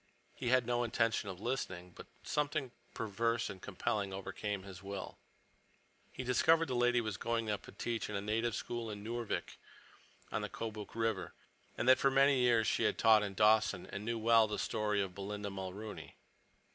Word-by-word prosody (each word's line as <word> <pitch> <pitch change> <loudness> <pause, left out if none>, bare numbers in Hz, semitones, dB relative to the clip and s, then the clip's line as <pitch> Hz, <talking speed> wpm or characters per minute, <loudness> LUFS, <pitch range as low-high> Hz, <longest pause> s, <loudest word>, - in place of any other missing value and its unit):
He 120 - -3
had 130 -1 +4
no 120 0 +1
intention 115 -3 +1
of 90 -2 -7
listening, 90 -7 -3
but - - -10 0.2
something 145 -3 -1 0.2
perverse 115 +2 0
and 95 -2 -11
compelling 100 -2 -2
overcame 100 +1 -4
his 95 -1 -10
will. 100 -1 -6 0.9
He 130 - -5
discovered 160 +6 +4
the 130 - -2
lady 120 0 +3
was 110 -5 -3
going 115 -2 -1
up 105 - -2
to - - -9
teach 115 +2 -3
in 105 - -4
a - - 0
native 110 +2 0
school 120 -1 -4
at 105 - -5
Noorvik, 115 +2 -4 0.7
on - - -1
the - - -3
Kobuk 110 -2 -6
River, 115 -4 -1 0.4
and 110 - -1
that 130 0 +7
for 135 - +4
many 135 0 +4
years 120 -3 +4
she - - +1
had - - +2
taught 110 -1 +6
in 100 -2 -3
Dawson 105 -3 +4
and 100 - -5
knew 115 +1 -1
well 115 0 +5
the 105 - -3
story 105 -2 0
of 95 -2 -6
Belinda 100 +1 -5
Mulrooney. 95 +3 -7
110 Hz, 185 wpm, -34 LUFS, 100-120 Hz, 0.9 s, that